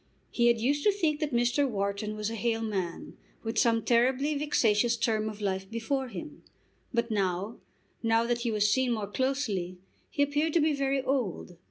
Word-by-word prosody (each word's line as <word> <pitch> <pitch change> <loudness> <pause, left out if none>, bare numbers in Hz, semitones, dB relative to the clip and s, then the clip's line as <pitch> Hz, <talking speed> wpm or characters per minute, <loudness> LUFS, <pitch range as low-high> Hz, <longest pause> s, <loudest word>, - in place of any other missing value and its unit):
He 240 -1 +3
had 235 -1 +4
used 285 +5 +1
to 415 - +6
think 325 -7 0
that 305 -2 -2
Mr. 245 +3 +2
Wharton 200 0 -2
was 215 +1 -3
a - - -4
hale 225 0 -1
man, 190 -6 -4 0.3
with 225 0 -1
some 230 -2 +3
terribly 260 +5 +2
vexatious 240 -6 +2
term 220 -2 0
of 215 0 -9
life 190 -1 -2
before 245 +4 -2
him. 245 - -8 0.5
But 235 -1 0
now, 195 +1 -1 0.4
now 225 0 +2
that 240 0 0
he 235 0 -1
was 210 -1 +2
seen 250 +3 +2
more 215 -3 -2
closely, 205 -6 -2 0.3
he 285 - +1
appeared 295 +2 0
to 340 - +4
be 310 0 +3
very 275 -1 0
old. 245 -10 -2
235 Hz, 185 wpm, -29 LUFS, 210-270 Hz, 0.5 s, to